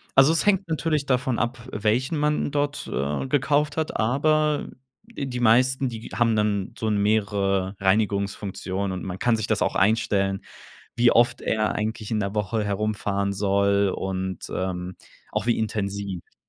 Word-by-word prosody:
Also, 135 Hz, +3 st, +7 dB
es 165 Hz, -, +1 dB
hängt 195 Hz, -2 st, +3 dB
natürlich 155 Hz, -2 st, 0 dB
davon 130 Hz, -2 st, +1 dB
ab, 120 Hz, +1 st, -1 dB
welchen 115 Hz, +9 st, 0 dB
man 150 Hz, 0 st, +1 dB
dort, 145 Hz, 0 st, -2 dB
äh, 70 Hz, -, -2 dB
gekauft 145 Hz, +2 st, +1 dB
hat, 160 Hz, -, -2 dB
aber 150 Hz, +6 st, +1 dB, 0.4 s
die 135 Hz, -, -5 dB
meisten, 130 Hz, +3 st, +4 dB
die 115 Hz, -1 st, -7 dB
haben 115 Hz, -2 st, +2 dB
dann 105 Hz, -2 st, 0 dB
so 110 Hz, -, -3 dB
'n 105 Hz, -1 st, +1 dB
mehrere 100 Hz, -2 st, +1 dB
Reinigungsfunktionen 100 Hz, -1 st, -1 dB
und 95 Hz, -1 st, -5 dB
man 95 Hz, 0 st, -5 dB
kann 120 Hz, -2 st, +3 dB
sich 110 Hz, -1 st, -2 dB
das 110 Hz, -3 st, 0 dB
auch -, -, +1 dB
einstellen, 100 Hz, -1 st, +2 dB, 0.5 s
wie 120 Hz, 0 st, +5 dB
oft 120 Hz, +1 st, +3 dB
er 110 Hz, -1 st, 0 dB
eigentlich 110 Hz, 0 st, -3 dB
in 110 Hz, -, 0 dB
der 100 Hz, 0 st, -2 dB
Woche 105 Hz, +1 st, -1 dB
herumfahren 100 Hz, -1 st, -1 dB
soll 100 Hz, 0 st, +2 dB
und, 95 Hz, -1 st, -4 dB
ähm, 90 Hz, -1 st, -3 dB, 0.4 s
auch 100 Hz, -, -2 dB
wie 120 Hz, -, +1 dB
intensiv. 100 Hz, -4 st, -4 dB
110 Hz, 155 wpm, -24 LUFS, 100-130 Hz, 0.5 s, Also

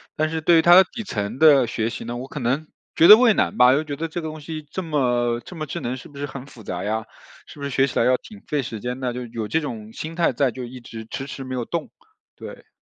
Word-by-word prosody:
但 155 Hz, -1 st, 0 dB
是 160 Hz, 0 st, -2 dB
对 165 Hz, +1 st, +5 dB
它 175 Hz, +1 st, +7 dB
的 190 Hz, -, +9 dB
底 235 Hz, -, -6 dB
层 110 Hz, -, -4 dB
的 145 Hz, -5 st, +7 dB
学 115 Hz, -1 st, -2 dB
习 -, -, -7 dB
呢， 120 Hz, -, -5 dB
我 130 Hz, -, -6 dB
可 145 Hz, -, -7 dB
能 135 Hz, +5 st, -1 dB, 0.3 s
觉 165 Hz, -, +6 dB
得 215 Hz, -, +12 dB
畏 240 Hz, -3 st, +5 dB
难 -, -, 0 dB
吧， 125 Hz, +1 st, +7 dB
又 145 Hz, -, +1 dB
觉 145 Hz, -2 st, -5 dB
得 165 Hz, +3 st, -3 dB
这 170 Hz, +2 st, -5 dB
个 160 Hz, -, -5 dB
东 155 Hz, 0 st, -7 dB
西 155 Hz, +1 st, -6 dB
这 190 Hz, -, -4 dB
么 120 Hz, -6 st, 0 dB
这 180 Hz, -, -11 dB
么 155 Hz, -, -4 dB
智 160 Hz, +4 st, -5 dB
能 125 Hz, -4 st, -3 dB
是 -, -, -12 dB
不 140 Hz, -1 st, -12 dB
是 145 Hz, -, -3 dB
很 135 Hz, -1 st, -8 dB
复 120 Hz, -5 st, -14 dB
杂 90 Hz, -2 st, -4 dB
呀， 110 Hz, +2 st, -2 dB, 0.4 s
是 -, -, -13 dB
不 140 Hz, -, -8 dB
是 140 Hz, -, -3 dB
学 135 Hz, +1 st, +3 dB
起 -, -, -5 dB
来 -, -, +3 dB
要 130 Hz, 0 st, +4 dB
挺 210 Hz, -2 st, -14 dB
费 150 Hz, -2 st, 0 dB
时 115 Hz, -3 st, -6 dB
间 125 Hz, +4 st, -4 dB
呢？ 125 Hz, -2 st, -2 dB
就 125 Hz, 0 st, -5 dB
有 115 Hz, -2 st, -5 dB
这 160 Hz, +8 st, 0 dB
种 110 Hz, -6 st, -7 dB
心 160 Hz, +1 st, -6 dB
态 170 Hz, -4 st, +2 dB
在 130 Hz, +1 st, +1 dB
就 130 Hz, +2 st, -7 dB
一 125 Hz, +1 st, -8 dB
直 115 Hz, -2 st, -10 dB
迟 135 Hz, -, -5 dB
迟 135 Hz, 0 st, -7 dB
没 130 Hz, 0 st, -5 dB
有 120 Hz, -, -3 dB
动。 170 Hz, +2 st, -4 dB, 0.5 s
对。 -, -, -11 dB
135 Hz, 315 characters per minute, -23 LUFS, 120-155 Hz, 0.5 s, 得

